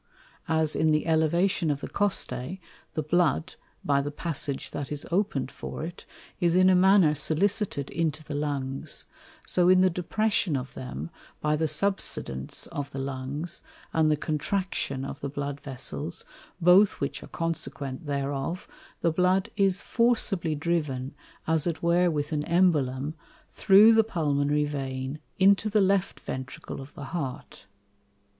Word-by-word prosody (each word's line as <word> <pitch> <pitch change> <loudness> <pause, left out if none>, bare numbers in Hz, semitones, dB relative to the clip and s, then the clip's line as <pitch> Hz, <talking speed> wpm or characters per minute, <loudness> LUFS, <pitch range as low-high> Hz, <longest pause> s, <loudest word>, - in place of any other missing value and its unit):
As 160 -1 +1
in 160 - +2
the 155 0 +2
Elevation 165 +2 +2
of 145 -1 -1
the - - -4
Costæ, 190 -5 -1 0.4
the 155 - -1
Blood, 155 - +1 0.3
by 140 -1 +3
the 145 - -3
passage 145 -2 -3
that 145 - -5
is 145 -1 -4
open'd 175 -8 0
for - - -6
it, 170 +2 -8 0.3
is 170 -1 +2
in 185 +1 +6
a - - +5
manner 185 -3 +5
solicited 160 0 0
into 160 -2 -1
the 150 - -7
Lungs; 140 -2 -2 0.4
so 180 0 +3
in 185 0 +6
the 185 0 +4
Depression 185 -1 0
of 130 +1 -6
them, 130 +6 -6 0.3
by 150 0 +1
the 160 +1 0
subsidence 150 - -2
of 145 -1 -4
the 135 - -8
Lungs, 135 +5 -4 0.3
and 160 -1 +3
the 150 - +3
Contraction 150 -3 -2
of - - -6
the 140 - -3
Blood 145 0 -4
Vessels, 145 +4 -5 0.3
both 180 +4 +5
which 140 - -3
are - - -10
consequent 150 -4 -4
thereof, 140 +4 -2 0.3
the 170 - +3
Blood 185 +5 +2
is 195 -2 +2
forcibly 220 -9 +1
driven, 145 -5 -1 0.3
as 160 0 +1
it 170 -1 -3
were 175 +1 +4
with 150 -2 -2
an 150 -1 0
Embolum, 150 -6 +2 0.4
through 210 +3 +7
the 225 0 +5
Pulmonary 150 -7 +1
Vein 135 -1 -4 0.2
into 200 +2 +4
the 210 +1 +3
Left 195 -1 +2
Ventricle 130 +1 -6
of 135 +2 -11
the 145 - -7
Heart. 140 - -5
155 Hz, 150 wpm, -27 LUFS, 140-180 Hz, 0.4 s, through